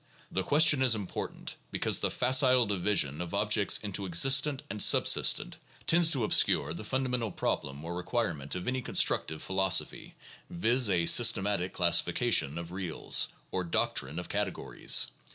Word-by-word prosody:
The 95 - -2
ques 145 - +2
tion 145 -4 +4
is 125 -3 +3
important, 100 -4 -7
because - - 0
the - - -1
facile 130 -1 +3
division 90 -7 -1
of 90 +2 -6
objects 105 -1 +2
into 100 -1 -5
existent 135 - +3
and 105 - -4
subsistent - - +3 0.3
tends 170 0 +3
to 135 -7 0
obscure 75 -7 +2
the 85 - -8
fundamental 125 -2 -3
problem 70 -2 -4
or 85 +1 -6
re 90 - -6
quirement 85 - -3
of 90 - -6
any 130 +1 -2
constructive 80 -9 -1
philosophy, 95 -1 -1 0.3
viz., 115 +6 0
a 85 -3 0
systematic 100 -4 +2
classifi 85 -2 +1
cation 70 +4 +1
of 85 0 -8
reals, 90 -3 -1 0.2
or 95 - -3
doctrine 80 -3 -2
of 90 - -6
categories. 100 -2 -1
100 Hz, 155 wpm, -29 LUFS, 85-125 Hz, 0.3 s, tion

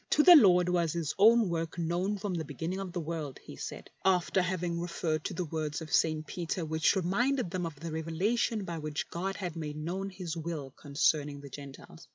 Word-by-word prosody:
" - - -48
To 300 - +5
the 355 +1 +10
Lord 180 - +7
was 175 -3 +1
His 165 -4 -2
own 225 +1 +6
work 165 -1 -3
known 175 +5 0
from 200 -1 -3
the 165 -2 -2
beginning 160 +6 -4
of 195 -2 -5
the 175 - -3
world," 155 -4 -4
he - - -10
said, - - -7
after 185 0 +3
having 180 -2 -1
referred 165 -2 -2
to - - -3
the 180 0 -2
words 155 -2 -3
of 160 -1 -7
St. 155 -1 +2
Peter 170 0 -3
which 160 +4 +2
reminded 200 +4 +1
them 180 -2 -2
of 150 -4 -9
the 165 +1 -5
revelation 190 +8 0
by 170 -3 -4
which 150 -1 -4
God 190 +3 -2
had 175 -4 -4
made 150 -2 -5
known 180 +6 -3
His 180 -3 -5
will 160 -4 -5
con 140 +1 -13
cerning 145 -2 +2
the 140 - -9
Gentiles. 140 +4 -11
170 Hz, 215 wpm, -31 LUFS, 155-185 Hz, -, the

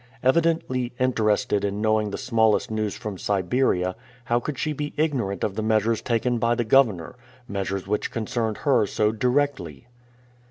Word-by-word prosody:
Evidently 130 -4 +1
interested 110 -5 +1
in 100 0 -2
knowing 110 -1 +1
the 100 - -4
smallest 115 -2 +1
news 110 -2 -2
from 105 -6 -6
Siberia, 95 -2 0 0.3
how 120 0 +2
could 140 +2 -5
she 155 +3 -1
be 150 0 -5
ignorant 125 - -1
of 100 - 0
the 110 - -3
measures 110 +1 +1
taken 120 0 0
by 115 +1 +2
the 120 - 0
governor, 110 -9 +3 0.3
measures 100 -2 -3
which 105 +2 -1
concerned 110 -1 -2
her 130 -7 +3
so 105 +2 +1
directly? 125 - -1
110 Hz, 155 wpm, -24 LUFS, 105-125 Hz, 0.3 s, governor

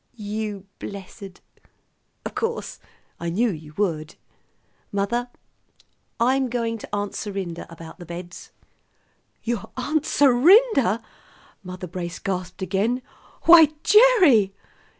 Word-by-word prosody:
"You 210 -2 -5
blessed! 195 -1 -9 0.8
Of - - -5
course, 460 +1 -3 0.4
I 170 - -3
knew 220 +7 +1
you 155 -3 -10
would. 165 -6 -2 0.8
Mother, 220 +5 -1 0.9
I'm 260 +2 +2
going 230 -1 -2
to - - -10
Aunt 205 0 -2
Serinda 190 -5 -5
about 165 +2 -11
the 175 - -9
beds." 175 +1 -9 0.9
"Your 225 -2 -3
Aunt 305 +4 -1
Serinda?" 275 - +4 0.6
Mother 185 -1 -7
Brace 175 -1 -6
gasped 185 -1 -4
again. 210 +7 0 0.4
"Why, 325 -3 +8
Gerry!" 365 - +5
205 Hz, 105 wpm, -23 LUFS, 185-250 Hz, 0.9 s, Why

